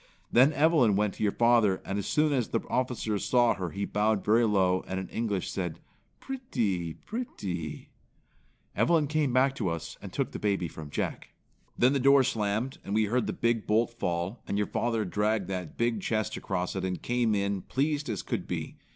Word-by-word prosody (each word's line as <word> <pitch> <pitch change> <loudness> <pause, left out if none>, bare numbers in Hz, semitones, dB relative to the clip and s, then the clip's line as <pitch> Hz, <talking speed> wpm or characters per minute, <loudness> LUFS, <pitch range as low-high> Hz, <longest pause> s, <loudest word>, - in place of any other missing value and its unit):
Then 130 +5 +6
Evelyn 145 -8 +4
went 105 0 +1
to - - -11
your 105 -2 +3
father 115 -5 +3
and 100 +1 -2
as 100 - -4
soon 150 -1 +2
as 125 -5 +1
the - - -1
officer 120 -4 0
saw 120 +1 +3
her 90 -2 -4
he 100 +3 -3
bowed 105 0 0
very 115 +3 +4
low, 95 -3 +2
and 95 - -2
in 95 - -5
English 105 -5 -2
said, 90 -4 -3 0.4
'Prettee, 110 - -2
prettee.' 100 - -5 0.9
Evelyn 165 -3 +3
came 150 -2 0
back 130 +2 +3
to 100 -6 0
us 85 -1 -5
and - - -8
took - - -2
the - - -6
baby 100 -4 0
from 80 -2 -9
Jack. - - -4 0.4
"Then 125 +3 +4
the 140 - +1
door 140 +1 +6
slammed, 110 +3 -1
and 100 - -3
we 110 - +4
heard 120 +4 0
the - - 0
big 115 -2 0
bolt 115 +3 +2
fall, 90 0 -3
and 100 - -1
your 105 - +1
father 115 -1 -1
dragged 105 +1 0
that 90 -4 -5
big 115 -3 0
chest 110 -1 -1
across 90 +1 -3
it 95 - -2
and 90 -1 -2
came 120 -3 +1
in 100 0 0
as 95 - -9
pleased 145 +1 0
as 105 -4 -3
could - - -3
be. - - -4
110 Hz, 200 wpm, -29 LUFS, 95-125 Hz, 0.9 s, Then